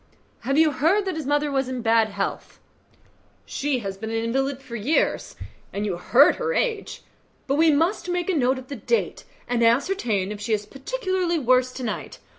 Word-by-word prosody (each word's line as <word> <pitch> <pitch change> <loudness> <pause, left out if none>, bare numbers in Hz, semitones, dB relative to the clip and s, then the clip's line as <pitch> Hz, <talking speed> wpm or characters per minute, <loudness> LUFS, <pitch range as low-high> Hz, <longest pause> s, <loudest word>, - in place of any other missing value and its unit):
"Have 275 +4 -1
you 315 -1 +5
heard 330 +10 +2
that 375 -3 -2
his 310 -4 -4
mother 290 0 +1
is 265 -1 -2
in 255 -2 -4
bad 225 -1 +3
health?" 200 -1 -4 0.9
"She 270 -3 -2
has 195 -1 -4
been 220 +2 -6
an 225 - -3
invalid 265 +4 -1
for 255 -3 -9
years, 240 +9 0 0.4
and 205 +1 -3
you 195 -4 -1
heard 250 +10 +5
her 475 0 -1
age; 455 -4 -2 0.4
but 275 - 0
we 320 +3 +4
must 335 +6 +1
make 355 -1 -1
a 380 - +1
note 260 -4 +2
of 260 0 -9
the 280 - -6
date, 465 - -1 0.2
and 245 -1 0
ascertain 230 - +1
if 210 -1 -7
she 220 +2 -1
is 210 -1 -1
particularly 365 - -2
worse 255 -2 +3
to 255 - -6
night. 225 - -4
270 Hz, 195 wpm, -24 LUFS, 230-320 Hz, 0.9 s, you